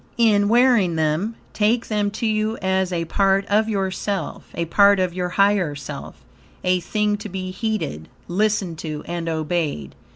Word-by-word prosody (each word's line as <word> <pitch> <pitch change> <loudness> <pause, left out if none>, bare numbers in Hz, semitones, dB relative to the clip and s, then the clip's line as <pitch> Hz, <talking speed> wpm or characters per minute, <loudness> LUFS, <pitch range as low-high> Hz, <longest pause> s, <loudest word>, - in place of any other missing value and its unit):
In 210 -3 +4
wearing 235 -7 +4
them, 160 +8 0 0.2
take 225 +3 +1
them 210 -2 0
to 215 +3 -4
you 215 +1 0
as 190 -1 0
a 170 -1 -1
part 195 +3 +2
of 215 +2 +2
yourself, 195 -3 -3
a 170 - -1
part 200 +4 +5
of 185 -2 0
your 180 0 -2
higher 195 -5 +2
self, 140 - -9 0.4
a 180 0 +2
thing 210 +3 0
to 210 +1 -7
be 185 0 -5
heeded, 190 - -3 0.2
listened 190 -3 0
to 155 -2 -5
and 170 -1 -3
obeyed. 155 - -2
195 Hz, 160 wpm, -22 LUFS, 170-210 Hz, 0.4 s, part